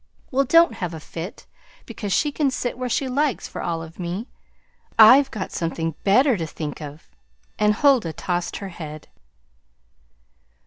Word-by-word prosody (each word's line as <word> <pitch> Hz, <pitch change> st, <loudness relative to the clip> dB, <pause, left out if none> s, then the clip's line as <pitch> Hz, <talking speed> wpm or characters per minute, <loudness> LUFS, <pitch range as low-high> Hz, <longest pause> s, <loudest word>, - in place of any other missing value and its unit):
"Well, 275 Hz, +1 st, +2 dB
don't 330 Hz, +5 st, +5 dB
have 175 Hz, -4 st, -4 dB
a -, -, -7 dB
fit! 165 Hz, +4 st, -8 dB, 0.4 s
because 215 Hz, -3 st, -6 dB
she 295 Hz, +9 st, +2 dB
can 290 Hz, -1 st, +1 dB
sit 250 Hz, -2 st, -3 dB
where 255 Hz, 0 st, -4 dB
she 265 Hz, +3 st, 0 dB
likes 275 Hz, +1 st, 0 dB
for -, -, -7 dB
all 165 Hz, -1 st, -2 dB
of 165 Hz, +2 st, -13 dB
me; 180 Hz, +7 st, -4 dB, 0.7 s
I've 260 Hz, +5 st, +8 dB
got 190 Hz, -4 st, -5 dB
something 165 Hz, -1 st, -2 dB
better 255 Hz, +6 st, +4 dB
to 165 Hz, -2 st, -3 dB
think 155 Hz, 0 st, -6 dB
of," 150 Hz, +1 st, -9 dB, 0.5 s
and 210 Hz, 0 st, +3 dB
Huldah 255 Hz, -, +3 dB
tossed 175 Hz, +1 st, -3 dB
her 195 Hz, -, -6 dB
head. 155 Hz, -3 st, -9 dB
200 Hz, 155 wpm, -23 LUFS, 165-260 Hz, 0.7 s, I've